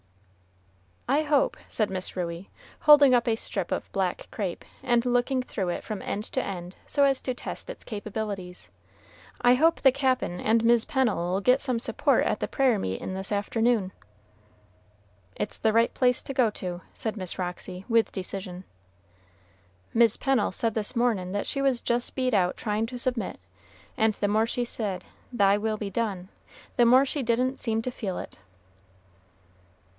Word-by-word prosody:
"I 285 +4 +2
hope," 305 +12 +2
said 215 -3 -1
Miss 185 -1 -2
Ruey, 175 0 -4 0.3
holding 290 -3 +7
up 240 -1 +3
a 225 - +3
strip 195 -5 -3
of - - -3
black 190 -2 -2
crape, 190 -6 -4 0.2
and 240 -2 +2
looking 245 +1 +1
through 195 -7 -3
it 175 - -3
from 215 -3 -5
end 210 - -3
to 260 - 0
end 180 -3 -6
so 285 - +2
as 275 -1 +3
to 255 - -2
test - - -6
its - - -7
capabilities, 205 -4 -6 0.7
"I 245 +1 +6
hope 325 +5 +3
the 265 - +6
Cap'n 255 -9 0
and 225 +1 +2
Mis' 235 -1 +5
Pennel'll 200 -8 0
get 250 +5 +4
some 250 -4 0
support - - +2
at - - 0
the - - -2
prayer 260 -6 +2
meetin' 95 - -3
this 190 +1 -4
afternoon." 210 0 +1 1.4
"It's 210 - -4
the 220 -1 +2
right 230 +1 +3
place 250 -1 +2
to 275 - -5
go 250 -4 +3
to," 180 -3 -5
said 220 -1 -3
Miss 185 -3 -2
Roxy, 180 +1 -4
with 230 -2 +2
decision. 185 -1 -5 1.3
"Mis' 230 -2 +4
Pennel 270 -6 +1
said 225 +3 0
this 215 +3 -3
mornin' 220 -7 0
that 205 - -1
she 275 - -2
was 270 -3 +1
just 240 +1 -1
beat 255 -2 0
out 180 -3 +2
tryin' 215 0 -1
to 250 +1 -6
submit; 245 -1 -2 0.6
and 220 -1 +2
the 205 - -1
more 220 +2 +2
she 245 +1 -1
said, 205 -6 -3 0.3
'Thy 200 -4 +3
will 215 +1 -1
be 205 -2 -5
done,' 195 -4 -2 0.5
the 240 - +6
more 255 +3 +6
she 285 +1 -2
didn't 250 +2 0
seem 225 -2 -1
to 255 - -3
feel 195 -6 -4
it." - - -8
225 Hz, 170 wpm, -27 LUFS, 195-250 Hz, 1.4 s, holding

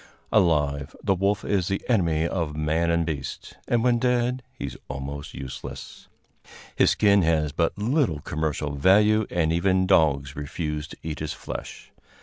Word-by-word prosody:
Alive, 75 -5 +2
the 100 - +3
wolf 100 +1 0
is 95 -4 +1
the 95 - -3
enemy 85 -8 +2
of 85 -4 -2
man 75 +2 0
and 85 0 +2
beast, 75 -4 -5
and 120 -1 +1
when 120 -1 +3
dead 125 +1 +1 0.2
he - - -4
is - - -6
almost 70 +2 -6
useless. 65 0 -8 0.7
His - - +4
skin 100 -2 +4
has 80 -3 +1
but 85 +5 0
little 115 - +1
commercial 75 0 -2
value, 105 +8 +4
and 80 -2 +1
even 95 +2 +2
dogs 70 -5 +2
refuse 75 +1 -4
to - - -12
eat 80 -1 -4
his 75 -1 -3
flesh. - - -8
85 Hz, 155 wpm, -25 LUFS, 75-100 Hz, 0.7 s, His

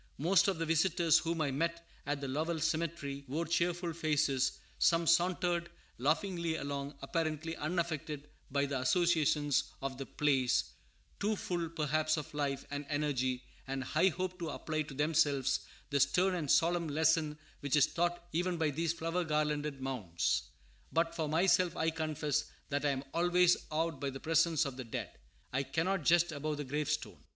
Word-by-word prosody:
Most 180 +6 +4
of 195 -3 +1
the 165 - -1
visitors 165 0 +3
whom 165 -1 -2
I 145 -3 +1
met 170 +4 -2 0.2
at 145 0 -1
the 140 - -3
Lowell 160 +5 -1
cemetery 155 -3 -2
wore 155 +6 -2
cheerful 170 +1 0
faces; 150 -4 +1 0.3
some 165 0 +4
sauntered 175 0 +2 0.3
laughingly 165 - 0
along, 140 -1 -4
apparently 160 +1 -2
unaffected 155 -3 -3 0.2
by 140 +1 +1
the 140 -1 -2
associations 150 -2 +2
of 135 -1 -4
the 135 - -5
place; 135 -4 +1 0.5
too 210 +2 +1
full, 175 -4 -2
perhaps, 155 0 0
of 150 - -6
life, 140 -2 -2
and 145 0 -4
energy, 130 -4 0 0.2
and 135 0 -2
high 155 +7 +2
hope 185 +1 -2
to 170 -2 -3
apply 155 +1 -2
to 145 -2 -7
themselves 145 -3 +2 0.3
the 140 - +2
stern 180 +8 +3
and 160 -6 -2
solemn 170 +2 +3
lesson 155 0 +2 0.2
which 145 -1 0
is 145 - +6
taught 175 0 -1
even 175 +2 0
by 160 -2 +1
these 165 +3 0
flower 170 +2 -1
garlanded 150 -2 -1
mounds. 85 - -1 0.4
But, 165 0 +1
for 160 -3 -1
myself, 180 +2 +3
I 160 0 +1
confess 150 -2 -1 0.2
that 145 0 -1
I - - +4
am 135 -1 -1
always 175 +1 +4
awed 160 -1 -1
by 140 - -1
the 135 0 -7
presence 165 0 +2
of 135 -2 -5
the 130 - -4
dead. 115 - -5 0.4
I 135 - +2
cannot 165 +4 -1
jest 170 0 +4
above 150 0 -3
the 145 - -3
gravestone. 145 +2 -2
155 Hz, 165 wpm, -33 LUFS, 140-170 Hz, 0.5 s, is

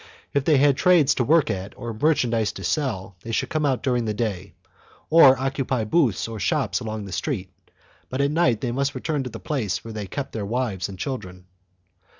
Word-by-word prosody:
If 140 -1 +1
they 155 -3 +4
had 140 0 +4
trades 175 -5 +5
to 125 - 0
work 155 +4 +3
at 95 +1 -6
or 120 -2 -5
merchandise 115 -5 +1
to - - -8
sell 100 - -2
they 115 - -7
could 110 - -1
come 155 -1 0
out 130 -3 0
during 125 -3 +1
the 105 -1 -2
day, 100 -4 -3 0.6
or 140 -5 +8
occupy 135 -2 -1
booths 115 - +1
or 115 -1 -6
shops 90 -2 0
along 110 -3 -5
the 95 - -9
streets, 95 - -3 0.6
but 130 - -4
at 140 +1 +2
night 155 -9 +2
they 125 - -1
must 140 +2 -1
return 145 +3 -2
to 130 - -5
the - - -8
place 105 - -2
where 115 - -7
they 105 -2 -5
kept 140 +7 -5
their 110 - -4
wives 105 -3 -2
and 95 - -8
children. 95 -7 -6
125 Hz, 205 wpm, -24 LUFS, 105-140 Hz, 0.6 s, or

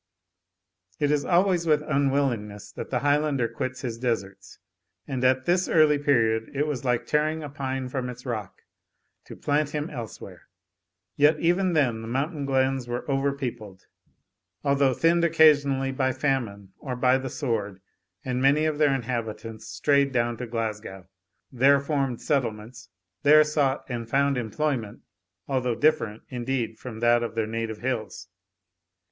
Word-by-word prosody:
It 145 -1 +1
is 145 -1 +1
always 175 -1 +2
with 150 -1 +3
unwillingness 135 -8 -1
that - - -7
the 125 -2 -1
Highlander 145 -3 +1
quits 130 +2 -5
his 115 -2 -5
deserts, 105 -6 -3 0.5
and 130 -3 -3
at 130 0 +3
this 180 +1 +2
early 155 -2 +4
period 115 -6 +2
it 145 +2 +1
was 145 -4 -3
like 125 -2 0
tearing 155 +1 0
a 145 - -6
pine 135 -2 -4
from 125 -1 -3
its 125 +1 -9
rock, 110 -6 -5 0.6
to - - -10
plant 145 +1 -1
him 150 +2 -3
elsewhere. 115 -8 -9 0.7
Yet 150 +2 +4
even 175 +2 +2
then 125 -8 +1
the 115 - -7
mountain 140 +4 -2
glens 130 -1 +1
were 120 0 -4
over 140 0 +1
peopled, 120 -8 -7 0.8
although 140 -2 +2
thinned 170 +4 +3
occasionally 145 -5 +4
by 130 -1 0
famine 120 -8 -2
or 130 -3 -5
by 125 +1 +3
the 130 0 -5
sword, 110 -8 -3 0.5
and 125 -1 -1
many 140 +3 +4
of 155 -1 -1
their 145 -3 +4
inhabitants 115 -3 -5
strayed 140 +2 +2
down 120 -2 0
to 125 - -5
Glasgow 105 -5 -5 0.4
there 135 +3 +4
formed 135 -4 -2
settlements 120 -5 -2 0.3
there 155 +1 +7
sought 145 -3 0
and 115 -3 -5
found 140 +1 +2
employment, 120 -1 -2 0.5
although 125 -3 0
different, 120 -6 +1
indeed, 120 -2 -3
from 115 -3 -8
that 120 0 +4
of 115 -1 -4
their 115 -1 0
native 110 0 -4
hills. 120 -3 -4
130 Hz, 150 wpm, -26 LUFS, 115-145 Hz, 0.8 s, there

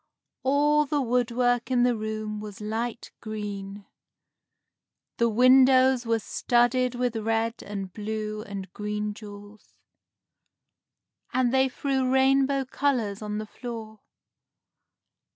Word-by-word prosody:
All 295 +2 +3
the 290 +1 0
woodwork 245 -1 +1
in 250 -2 +3
the 245 -1 +3
room 215 -1 -4
was 210 -2 -8
light 225 +3 -4
green. 205 -2 -6 1.3
The 235 0 +3
windows 255 +1 +5
were 230 0 +2
studded 245 +4 +1
with 245 -1 -1
red 225 +1 -1
and 195 -3 -6
blue 215 0 -4
and 195 -3 -7
green 210 0 -3
jewels, 205 0 -13 1.6
and 250 -1 +1
they 265 0 +3
threw 265 -1 -1
rainbow 270 +1 +3
colors 245 -7 -1
on 210 0 -4
the 215 - -4
floor. 220 -1 -8
230 Hz, 110 wpm, -26 LUFS, 210-255 Hz, 1.6 s, windows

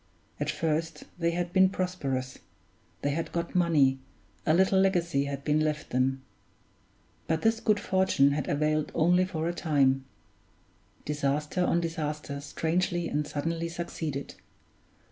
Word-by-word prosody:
At - - -1
first 165 +1 -1 0.2
they 170 -1 +2
had 175 +1 -2
been 190 0 +6
prosperous, 140 -10 -3 0.6
they 145 - +1
had 165 +3 -3
got 170 0 -3
money, 150 -7 +3 0.5
a 155 - +5
little 190 +1 +4
legacy 170 -7 +2
had 140 -1 -5
been 150 +1 +2
left 155 -1 -1
them. 130 +1 +1 1.0
But 160 0 0
this 225 0 +3
good 215 -2 +2
fortune 185 -7 +3
had 145 +1 -2
availed 150 +1 +1
only 175 +3 +4
for 165 -3 -3
a 170 - -1
time; 135 -5 +2 1.0
disaster 150 +4 0
on 170 -1 +2
disaster 150 -3 -4
strangely 170 +3 -1
and 150 0 -1
suddenly 165 +3 -2
succeeded. 160 -4 -4
160 Hz, 135 wpm, -28 LUFS, 145-175 Hz, 1.0 s, been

